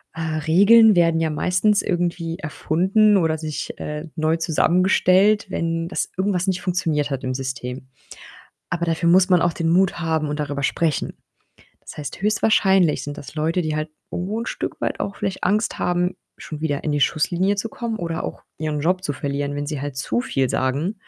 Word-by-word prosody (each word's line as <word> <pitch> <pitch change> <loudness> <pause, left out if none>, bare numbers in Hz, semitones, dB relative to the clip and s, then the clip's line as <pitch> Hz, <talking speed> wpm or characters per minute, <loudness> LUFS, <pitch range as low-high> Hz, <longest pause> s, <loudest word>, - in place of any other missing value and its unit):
äh, 165 - -5 0.2
Regeln 205 +5 +6
werden 165 -1 +3
ja 160 -1 +1
meistens 180 +6 +2
irgendwie 170 -2 -2
erfunden 190 +7 +2
oder 160 -3 +1
sich 155 -2 -5
äh, 150 +2 -5
neu 160 +1 +1
zusammengestellt, 185 +5 +3
wenn 165 -1 -2
das - - -3
irgendwas 190 -1 0
nicht 185 -1 0
funktioniert 160 -5 0
hat 135 -1 -3
im 130 - -2
System. 130 0 -5 0.8
Aber 170 0 -1
dafür 165 +1 0
muss 185 +2 +5
man 180 -2 +4
auch 175 - +2
den 165 -1 -2
Mut 185 +2 +3
haben 160 -2 0
und 150 +1 -3
darüber 140 -1 -3
sprechen. 155 +1 -1 0.6
Das - - -12
heißt, 145 +3 -7
höchstwahrscheinlich 195 -5 +3
sind 145 0 -6
das 145 - -10
Leute, 160 +3 0
die 155 -1 -2
halt 155 +1 -3 0.2
irgendwo 200 +6 -3
'n - - -5
Stück - - -4
weit - - -2
auch 200 - -3
vielleicht 190 - -3
Angst 210 +4 0
haben, 180 +1 0 0.2
schon 155 -1 -8
wieder 145 -3 -2
in 155 - 0
die 145 - 0
Schusslinie 180 +8 +1
zu 225 +3 -2
kommen 230 -1 -4
oder 165 -1 -3
auch - - -6 0.2
ihren 155 -1 -2
Job 180 +4 +1
zu 145 - -2
verlieren, 140 +1 -3
wenn 145 - -3
sie 150 -2 -4
halt 145 -2 -5
zu 185 - -1
viel 135 - 0
sagen. 140 +10 -1
165 Hz, 190 wpm, -22 LUFS, 150-185 Hz, 0.8 s, Regeln